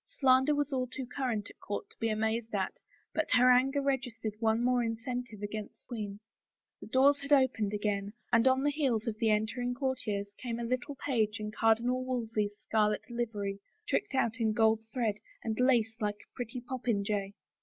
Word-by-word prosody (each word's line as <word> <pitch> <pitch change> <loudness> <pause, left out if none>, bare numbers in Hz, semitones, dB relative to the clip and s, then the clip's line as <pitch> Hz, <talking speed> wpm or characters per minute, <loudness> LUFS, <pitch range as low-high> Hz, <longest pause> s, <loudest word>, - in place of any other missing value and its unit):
Slander 265 +2 +5
was 290 -1 0 0.2
too 260 0 -5
current 245 -5 -2
at - - -22
court 205 - -4
to - - -13
be 225 - +1
amazed 220 +1 -1
at, 190 -2 0 0.4
but 315 - 0
her 250 0 +7
anger 270 +3 +3
r^stered 245 -6 -1
one 225 +1 +2
more 250 0 +3
incentive 230 -1 -4
against 210 0 -5
the - - -32
queen. 210 -4 -5 0.6
The - - -10
doors 280 +2 +4
had 280 +1 -7
opened 260 -7 +4
again 205 -1 -1 0.2
and 235 +1 +5
on 260 +1 +4
the 290 - +3
heels 265 -7 0
of 215 -2 -3
the 225 - +3
entering 230 +4 0
courtiers 235 -7 -2
came 235 -2 -3
a 235 - -3
little 255 +4 -2
page 225 -5 +1
in 210 0 -4
Cardinal 235 +3 +2
Wolsey's 225 -5 -2
scarlet 210 +2 0
livery, 210 -4 -2 0.3
tricked 410 -8 0
out 230 -2 +1
in 220 -2 +2
gold 220 -1 +4
thread 215 -3 0 0.2
and 220 0 -2
lace 240 -4 +3
like 205 -2 -2
a - - -54
pretty 245 +1 -5
popinjay. 210 -6 -1
230 Hz, 180 wpm, -31 LUFS, 215-255 Hz, 0.6 s, her